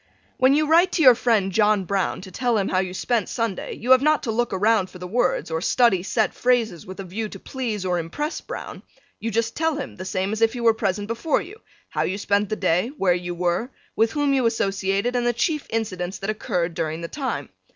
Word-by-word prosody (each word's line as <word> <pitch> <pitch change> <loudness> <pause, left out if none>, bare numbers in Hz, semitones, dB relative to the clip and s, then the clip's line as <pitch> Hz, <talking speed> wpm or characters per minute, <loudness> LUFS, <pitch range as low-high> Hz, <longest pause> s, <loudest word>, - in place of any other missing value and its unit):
When 260 +2 +5
you 305 +1 +3
write 340 +4 +4
to 325 - +2
your 255 -2 +9
friend 225 -5 +1
John 210 -1 +3
Browne 195 0 -1
to 190 0 -10
tell 240 +3 0
him 195 - 0
how 185 - +1
you 185 -1 -2
spent 225 +5 -1
Sunday 230 -5 -3
you 245 +3 -2
have 260 0 +8
not 305 +1 +2
to 235 - -1
look 240 +2 0
around 205 0 +2
for - - -12
the 180 - -7
words, 215 -3 0
or 160 0 -1
study 220 -2 +3
set 215 +4 0
phrases 230 -9 0
with 185 +1 -9
a - - -4
view 210 +4 -4
to 195 - -10
please 225 -7 -4
or 180 -1 +1
impress 295 - -4
Browne, - - -7 0.4
you 225 - -3
just 230 +1 -1
tell 320 -1 +1
him 285 - -6
the 185 - -6
same 190 +1 -2
as 220 +1 -3
if 225 0 +4
he 245 - -5
were 230 -1 +5
present 205 -1 -2
before 235 +7 0
you, 410 +5 -11 0.3
how - - -2
you 190 - -1
spent 205 0 0
the 215 - -1
day, 185 +1 +1
where 185 -5 +3
you 175 0 -4
were, 175 +7 0 0.3
with 225 +1 +2
whom 290 -2 +1
you 260 -3 +3
associated 200 +1 0
and 240 -1 +1
the 240 - +2
chief 300 +5 -1
incidents 190 -5 -3
that 195 +2 -2
occurred 180 -5 -2
during 160 0 -3
the 170 - -4
time. 275 - -4
215 Hz, 235 wpm, -23 LUFS, 185-245 Hz, 0.4 s, your